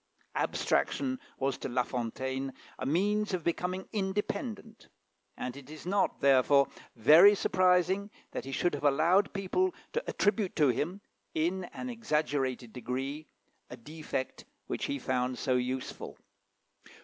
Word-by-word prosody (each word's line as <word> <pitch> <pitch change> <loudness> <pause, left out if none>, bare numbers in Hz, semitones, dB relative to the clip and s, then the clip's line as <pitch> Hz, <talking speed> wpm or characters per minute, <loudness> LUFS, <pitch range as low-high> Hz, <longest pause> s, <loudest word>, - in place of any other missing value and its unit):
Abstraction 260 -1 0 0.2
was 135 0 -1
to - - -4
La 125 0 +1
Fontaine 130 +3 -3 0.3
a - - -2
means 205 +6 +1
of 175 - -5
becoming 180 +3 -2
independent, 215 +3 -3 0.5
and 125 0 -4
it 140 -1 -11
is 155 +1 -10
not, 195 +2 +1
therefore, 140 +1 +5 0.3
very 160 - +8
surprising 185 +1 +2 0.2
that - - -4
he 135 - -6
should 175 +5 +1
have 145 - -4
allowed 165 +8 +4
people 280 - 0 0.2
to 475 - -1
attribute 205 -2 +1
to 150 -4 +4
him, 170 - -1 0.3
in 180 +4 0
an 255 - -7
exaggerated 145 - -1
degree, 135 +4 -4 0.4
a 125 - -8
defect 150 - -5 0.2
which - - -3
he 285 -1 -2
found 125 - -1
so 130 - 0
useful. 125 +1 -3
155 Hz, 135 wpm, -31 LUFS, 130-195 Hz, 0.5 s, very